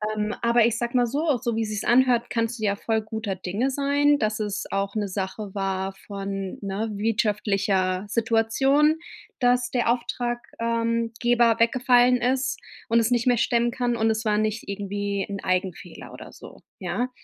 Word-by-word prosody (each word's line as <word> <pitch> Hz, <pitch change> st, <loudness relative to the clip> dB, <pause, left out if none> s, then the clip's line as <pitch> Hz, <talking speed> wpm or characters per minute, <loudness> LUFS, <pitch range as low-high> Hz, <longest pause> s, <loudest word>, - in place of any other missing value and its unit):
Ähm, 210 Hz, 0 st, -1 dB
aber 235 Hz, -1 st, +4 dB
ich 230 Hz, -1 st, +1 dB
sage 240 Hz, +1 st, -1 dB
mal 245 Hz, -, +4 dB
so, 290 Hz, +2 st, 0 dB
so 235 Hz, -1 st, -2 dB
wie 225 Hz, -, +1 dB
sich's 210 Hz, 0 st, -4 dB
anhört, 245 Hz, -1 st, +3 dB
kannst 230 Hz, 0 st, -1 dB
du -, -, -6 dB
ja 200 Hz, -, +1 dB
voll 220 Hz, 0 st, 0 dB
guter 220 Hz, -2 st, -4 dB
Dinge 195 Hz, +8 st, -2 dB
sein, 285 Hz, +1 st, +2 dB
dass 215 Hz, 0 st, -1 dB
es 210 Hz, -1 st, -2 dB
auch 195 Hz, +1 st, -2 dB
'ne 210 Hz, -1 st, -1 dB
Sache 195 Hz, +1 st, -4 dB
war 195 Hz, 0 st, -2 dB
von, 195 Hz, -1 st, -5 dB
ne, 200 Hz, +3 st, -3 dB
wirtschaftlicher 200 Hz, -3 st, 0 dB
Situation, 235 Hz, +7 st, +2 dB, 0.4 s
dass 250 Hz, 0 st, +2 dB
der 240 Hz, -2 st, +2 dB
Auftrag 240 Hz, 0 st, -2 dB, 0.2 s
ähm, 230 Hz, 0 st, 0 dB
Geber 235 Hz, -2 st, +3 dB
weggefallen 250 Hz, +1 st, +4 dB
ist 255 Hz, +2 st, 0 dB, 0.3 s
und 230 Hz, +1 st, +4 dB
es 230 Hz, +2 st, +1 dB
nicht 240 Hz, 0 st, +1 dB
mehr 245 Hz, -1 st, +4 dB
stemmen 235 Hz, +1 st, +2 dB
kann 245 Hz, -1 st, -1 dB
und 225 Hz, 0 st, +2 dB
es 220 Hz, +1 st, -1 dB
war 210 Hz, -1 st, +2 dB
nicht 215 Hz, +1 st, -1 dB
irgendwie 200 Hz, 0 st, -3 dB
'n 200 Hz, -1 st, -4 dB
Eigenfehler 185 Hz, -1 st, -3 dB
oder -, -, -10 dB
so, -, -, -13 dB, 0.2 s
ja? 250 Hz, +1 st, -2 dB
225 Hz, 175 wpm, -24 LUFS, 205-245 Hz, 0.4 s, aber